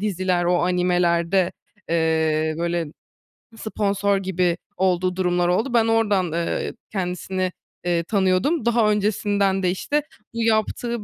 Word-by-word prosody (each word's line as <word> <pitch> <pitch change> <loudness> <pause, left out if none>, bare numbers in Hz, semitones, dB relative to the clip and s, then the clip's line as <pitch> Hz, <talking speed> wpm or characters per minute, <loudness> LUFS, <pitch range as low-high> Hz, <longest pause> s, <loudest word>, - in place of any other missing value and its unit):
diziler, 185 -3 0
o 175 0 +2
animelerde, 180 0 +1 0.4
eee, 160 -1 +1
böyle, 170 -1 -1 0.7
sponsor 200 -2 0
gibi 180 -3 0 0.2
olduğu 185 -1 +1
durumlar 180 -1 +1
oldu. 220 +8 0
Ben 225 -1 +4
oradan, 205 -6 +2
eee, 170 0 -2 0.2
kendisini, 185 -1 -2 0.3
eee, 170 -1 +1
tanıyordum. 200 - +1
Daha 235 -2 +3
öncesinden 205 -2 +1
de 180 - +2
işte 290 +10 -1 0.3
bu 230 0 -2
yaptığı 225 +1 0
185 Hz, 120 wpm, -22 LUFS, 175-210 Hz, 0.7 s, Ben